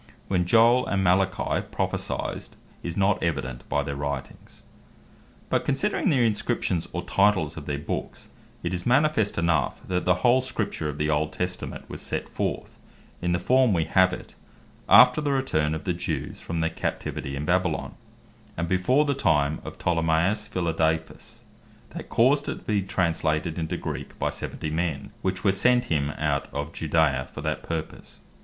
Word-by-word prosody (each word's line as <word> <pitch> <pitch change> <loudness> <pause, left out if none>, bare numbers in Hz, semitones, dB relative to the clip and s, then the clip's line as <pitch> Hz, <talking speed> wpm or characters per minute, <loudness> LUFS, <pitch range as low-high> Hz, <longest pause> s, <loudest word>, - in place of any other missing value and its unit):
When 90 -2 +1
Joel 115 +5 +5
and 95 -1 0
Malachi 95 +1 +1
prophecyed, - - -3 0.3
is 85 -1 -5
not 100 0 +2
evident 65 -7 -3
by 70 - +1
their 70 -1 -4
Writings. 70 0 -6 0.8
But - - +1
considering 195 +9 +1
the 130 -7 +3
Inscriptions, 105 -5 0
or 90 - -3
Titles 95 -6 +2
of 75 -3 -8
their 70 -1 -1
Books, 75 - -5 0.3
it 85 +1 -2
is 90 -1 -3
manifest 135 -4 +2
enough, 85 -2 +1
that 90 -1 -1
the 90 - +4
whole 125 +2 +5
Scripture 110 -11 -3
of 75 - -5
the 75 +1 0
Old 75 +1 0
Testament, 90 0 -4
was - - -8
set - - -4
forth - - -4 0.4
in 90 - 0
the 85 - +2
form 130 +3 +3
we 85 -3 +2
have 95 -1 +4
it, - - -8 0.6
after 125 +7 +8
the 145 -1 0
return 80 - +1
of 80 - -6
the 90 - 0
Jews 85 - -4
from 85 -1 -3
their 80 +1 0
Captivity 70 -3 -4
in 70 +2 -4
Babylon, 90 -1 0 0.6
and 85 +1 -1
before 125 - +3
the 140 - +1
time 75 - +1
of - - -8
Ptolemaeus 85 +4 +1
Philadelphus, 80 -2 -2 0.5
that - - -8
caused 140 +5 +3
it - - -2
to - - -12
bee 105 -2 +1
translated 85 -3 0
into 80 -1 -2
Greek - - -6
by - - -1
seventy 75 - -5
men, 85 +3 -2
which 95 0 -2
were 100 - +4
sent 125 +5 +3
him 70 -2 +1
out 75 -2 0
of 75 +3 -4
Judea 75 -5 +1
for - - -7
that 75 +1 -2
purpose. 80 -2 -6
90 Hz, 170 wpm, -26 LUFS, 80-105 Hz, 0.8 s, after